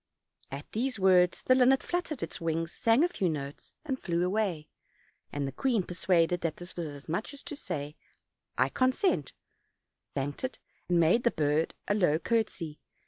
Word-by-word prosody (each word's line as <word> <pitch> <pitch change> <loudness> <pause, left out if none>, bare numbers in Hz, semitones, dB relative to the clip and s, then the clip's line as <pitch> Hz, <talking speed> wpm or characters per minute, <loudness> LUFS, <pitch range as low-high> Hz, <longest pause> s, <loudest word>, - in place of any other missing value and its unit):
At 140 +2 -6
these 250 +1 -1
words 185 -2 +4
the 255 - +5
linnet 260 +1 +5
fluttered 350 -5 -2
its - - -5
wings, 165 0 -1
sang 230 +6 +3
a - - +5
few 195 - -1
notes, 140 -2 -5
and 265 -4 -3
flew 175 0 0
away; 185 -6 0 0.6
and 145 -1 -2
the - - -4
queen, 230 - +1
persuaded 175 -1 +1
that 165 -2 -2
this 175 +1 -10
was 170 -2 -3
as 145 -1 -9
much 175 - -3
as 280 - -9
to 330 -4 -5
say, 150 - -5 0.6
"I - - +3
consent," 260 +9 +1 0.8
thanked 145 - -3
it, 260 - -2 0.3
and 175 -1 +4
made 170 +8 +4
the 235 - +5
bird 155 -3 0
a - - +2
low 175 -7 +3
courtesy. 175 -6 -1
180 Hz, 175 wpm, -30 LUFS, 160-240 Hz, 0.8 s, the